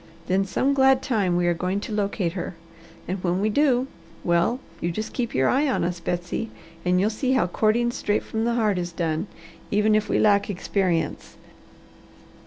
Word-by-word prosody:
Then 190 +2 +1
some 260 +8 +1
glad 265 -1 +4
time 205 -9 +1
we 175 - +1
are 175 - +3
going 180 +3 -1
to 220 - -6
locate 200 -4 -1
her, 185 -1 -5 0.5
and 185 +1 -3
when 180 0 +1
we 210 +2 +1
do, 260 -1 +3 0.4
well, 175 +8 +2 0.2
you 170 - -1
just 215 +5 -5
keep 240 -3 -2
your 130 0 +3
eye 285 +3 +2
on 265 - 0
us, 175 0 -2
Betsy, 175 +6 -3 0.3
and 180 0 +2
you'll 205 +4 +2
see 255 +4 0
how 260 - +3
courting 220 +6 +1
straight 210 -3 -1
from 220 0 -3
the 235 0 +1
heart 210 -5 +1
is 175 0 -3
done, 165 +1 -2 0.4
even 210 +1 +3
if 215 0 +1
we - - +2
lack 205 -1 +3
experience." 185 -3 -1
200 Hz, 190 wpm, -24 LUFS, 175-230 Hz, 0.5 s, glad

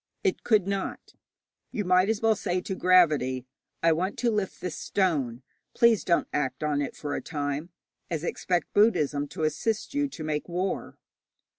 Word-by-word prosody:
It 390 - 0
could 215 -5 +3
not. 195 -1 -4 0.6
You 205 - -3
might 185 +2 +4
as 220 -1 0
well 225 -1 +4
say 180 -2 -1
to 185 - -4
gravity, 150 -9 +3 0.4
'I 165 - +5
want 180 +5 -1
to 240 -1 +1
lift 210 -3 -2
this 180 -4 -4
stone; 140 -13 0 0.3
please 235 -3 +4
don't 170 -2 +2
act 130 -1 -1
on 150 -1 +1
it 140 - -4
for 145 -1 -4
a - - -3
time,' 145 +1 -3 0.4
as 165 -2 -2
expect 175 -1 -1
Buddhism 150 -9 +3
to 160 +2 -5
assist 215 - -1
you 285 0 +1
to 175 - -8
make 155 +2 -2
war. 180 +2 -3
175 Hz, 170 wpm, -27 LUFS, 150-200 Hz, 0.6 s, I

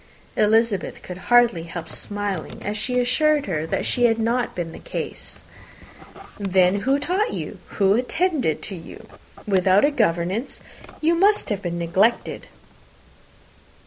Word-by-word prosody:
Elizabeth 215 -2 +1
could 180 0 -8
hardly 240 -7 +5
help 170 0 -7
smiling, 205 -4 -5
as 205 - -2
she 250 +4 -1
assured 295 +4 +2
her 160 -5 -2
that - - -1
had 240 -2 +3
not 235 +2 0
been 170 -2 -3
the - - -10
case. - - -6 1.0
"Then 190 -1 +3
who 270 +7 +2
taught 370 +9 0
you? - - -6 0.2
who 195 -1 +4
attended 255 - 0
to 195 - -4
you? 165 - -11 0.4
Without 195 +1 +4
a 295 - +2
governess, 195 - 0 0.4
you 325 +2 +3
must 400 +5 +3
have 205 -3 -2
been 175 -3 -3
neglected." 190 +7 +1
210 Hz, 135 wpm, -23 LUFS, 185-250 Hz, 1.0 s, hardly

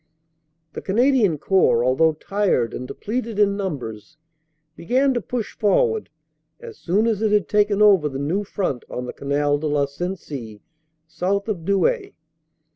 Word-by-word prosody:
"The - - -6
Canadian 225 - +2
Corps, 145 -8 +2
although 160 +5 +3
tired 175 - 0
and 125 - -6
depleted 230 - -4
in 200 -1 +3
numbers, 145 - -6 0.6
began 260 - +1
to 240 - -1
push 235 0 -4
forward 440 - +1 0.5
as 465 -3 -11
soon 200 +6 +1
as 220 -3 0
it 215 -1 +1
had 205 -6 +2
taken 210 +2 +2
over 190 -8 +5
the 135 - -6
new 160 +9 -1
front 185 -10 -3
on 125 - -5
the 125 - -6
Canal 145 +1 0
de 155 - -2
la 145 -1 +1
Sensee 140 - -6 0.4
south 195 +5 -2
of 185 -7 -3
Douai. 395 - +1
195 Hz, 150 wpm, -22 LUFS, 145-210 Hz, 0.6 s, over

